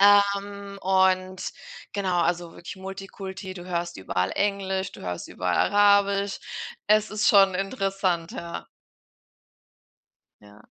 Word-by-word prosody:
Ähm, 200 0 +3
und 185 -1 +2 0.4
genau, 190 -3 0
also 175 0 -1
wirklich 175 - -9
Multikulti, 190 0 -7
du 175 -2 -8
hörst 170 -1 -2
überall 95 0 -1
Englisch, 195 -1 0
du - - -11
hörst 90 -1 -4
überall - - -1 0.2
Arabisch. 200 -1 +4 0.5
Es 215 0 +4
ist 215 0 +2
schon 195 -2 +6
interessant, 195 -4 -1
ja. 170 - -6 1.8
Ja. 105 +1 -16
190 Hz, 110 wpm, -26 LUFS, 175-200 Hz, 1.8 s, schon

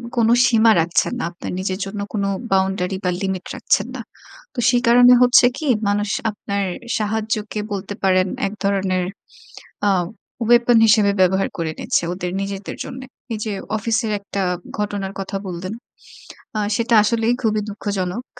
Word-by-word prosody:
কোন 230 -2 +3 0.2
সীমা 230 -1 +5
রাখছেন 165 +1 +1
না। - - -2
আপনার 175 - -7
নিজের 185 0 -2
জন্য 200 +1 -6
কোন 205 -2 -1 0.3
বাউন্ডারি 190 0 +1
বা, 180 - +1
লিমিট 190 -2 -2
রাখছেন - - +1
না। - - -5 0.5
তো 255 - -5
সে 245 - +3
কারণে 245 +1 +7
হচ্ছে 245 0 +6
কি? 310 - -4 0.2
মানুষ 205 +1 0 0.2
আপনার 200 -1 -3 0.3
সাহায্যকে 215 0 -2
বলতে 200 0 -4
পারেন 185 -1 +3 0.2
১ 195 - -6
ধরনের 190 -2 +1 0.9
আ - - +4 0.6
weapon 240 -1 +5
হিসেবে 210 -2 +4
ব্যবহার 190 +1 +3
করে 165 -2 -2
নিচ্ছে - - 0
ওদের 180 0 -4
নিজেদের 195 0 -5
জন্যে। 260 0 -8 0.3
এইযে 215 0 -3 0.2
অফিসের 225 +1 -1
একটা 200 0 -4 0.4
ঘটনার 205 -2 -3
কথা 195 +1 -4
বললেন। 185 +2 -5 0.8
আ - - +1 0.2
সেটা 230 +1 0
আসলেই 230 +2 +1
খুবই 215 -3 +1
দুঃখজনক। 200 +1 -3
205 Hz, 145 wpm, -20 LUFS, 190-225 Hz, 0.9 s, কারণে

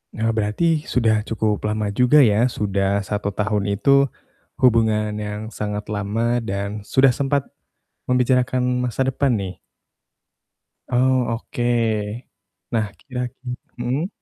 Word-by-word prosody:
Eee, 115 0 0
berarti 145 +9 0
sudah 110 -3 +2
cukup 105 -2 -1
lama 105 -1 -1
juga 125 +7 +5
ya, 110 +1 +4
sudah 100 -3 0
1 100 0 -3
tahun 105 -1 0
itu, 140 +5 +4 0.5
hubungan 110 -3 +3
yang 105 +1 -5
sangat 105 -1 -3
lama 110 +4 0
dan 100 -1 -3
sudah 130 0 +5
sempat 140 +2 0 0.6
membicarakan 125 0 +1
masa 130 +2 0
depan 135 0 +1
nih? 95 -4 -3 1.3
Oh, 130 0 +2
oke. 115 - -10 1.1
Nah, 110 -3 +1
kira-kir 125 -1 -5 0.2
mmm? 130 +8 -1
115 Hz, 115 wpm, -22 LUFS, 105-125 Hz, 1.3 s, juga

